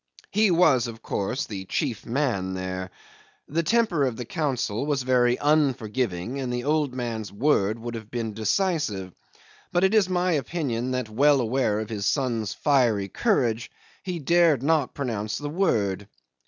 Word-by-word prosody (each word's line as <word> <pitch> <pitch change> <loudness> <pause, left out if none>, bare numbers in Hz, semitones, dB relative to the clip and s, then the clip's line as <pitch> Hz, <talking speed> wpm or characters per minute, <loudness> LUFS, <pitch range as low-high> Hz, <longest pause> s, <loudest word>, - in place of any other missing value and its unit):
He 215 0 +3
was, 160 -9 +4
of 115 -1 -9
course, 120 +7 -2
the 95 -3 -6
chief 120 +3 -2
man 115 -8 -1
there. 95 0 -4 0.6
The 165 +3 0
temper 215 -5 +2
of 125 -3 -1
the 125 - -5
council 135 -5 -2
was 140 -3 0
very 125 -1 +3
unforgiving, 130 - 0
and 130 -2 -3
the 125 0 -2
old 150 -2 0
man's 115 -5 -4
word 110 -2 +1
would 120 +1 -6
have 110 -2 -7
been 115 -2 -3
decisive; 110 - -1 0.6
but 175 - +2
it 190 +2 +3
is 210 -4 +4
my 180 0 +1
opinion 140 -6 -1
that, 125 -2 -2
well 140 +6 +4
aware 115 -3 +1
of 110 +1 -5
his 100 -2 -2
son's 115 -7 0
fiery 120 -9 +2
courage, 120 - 0 0.3
he 180 -2 -4
dared 165 -3 +3
not 155 -2 +1
pronounce 110 -6 -3
the 145 0 -5
word. 105 - 0
125 Hz, 160 wpm, -25 LUFS, 110-150 Hz, 0.6 s, was